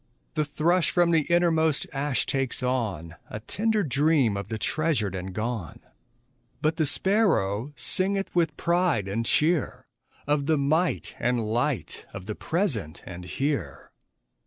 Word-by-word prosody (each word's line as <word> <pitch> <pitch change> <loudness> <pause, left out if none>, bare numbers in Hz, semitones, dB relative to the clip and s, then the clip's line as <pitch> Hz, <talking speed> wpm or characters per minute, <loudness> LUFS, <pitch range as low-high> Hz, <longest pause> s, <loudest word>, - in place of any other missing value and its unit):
The 150 - 0
thrush 165 +4 +2
from 175 -1 +3
the 160 -3 +2
innermost 160 -3 +3
ash 135 -2 -1
takes 135 -1 -2
on 100 -11 -2
A 105 - -5
tender 215 - 0
dream 140 - +2
of 100 -1 -4
the 110 - -3
treasured 135 - 0
and 95 0 -5
gone; 110 -4 -4 0.8
But 155 +1 0
the 155 -3 +2
sparrow 145 - +2
singeth 190 +10 0
with 160 -4 +1
pride 170 - +1
and 115 +4 -2
cheer 160 -1 +1 0.4
Of 145 -1 0
the 160 -1 +3
might 155 +5 0
and 120 -1 +1
light 120 +4 -2
of 90 - -7
the 105 - -3
present 125 - -2
and 90 -1 -8
here. 140 +6 -3
145 Hz, 140 wpm, -26 LUFS, 110-165 Hz, 0.8 s, from